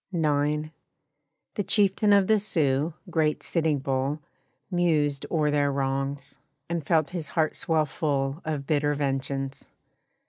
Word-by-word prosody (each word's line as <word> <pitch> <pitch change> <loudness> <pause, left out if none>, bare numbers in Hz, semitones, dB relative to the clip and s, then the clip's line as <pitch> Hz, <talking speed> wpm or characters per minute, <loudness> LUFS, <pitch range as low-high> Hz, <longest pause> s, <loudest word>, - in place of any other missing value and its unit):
IX. 150 -2 0 0.8
The 205 - -2
chieftain 205 +1 +2
of 200 -1 +6
the 215 +1 +3
Sioux, 155 -5 0 0.2
great 155 -2 +1
Sitting 160 -3 +1
Bull, 135 +1 -1 0.5
Mused 155 -6 +1
o'er 150 -3 +1
their 145 -1 +2
wrongs, 135 +1 -3 0.3
and 170 -2 -2
felt 155 -1 +2
his 170 -4 -3
heart 155 -2 0
swell 160 -2 +1
full 140 0 -2
Of 150 -3 -3
bitter 145 0 +1
vengeance. 135 -1 -2
150 Hz, 130 wpm, -26 LUFS, 140-165 Hz, 0.8 s, of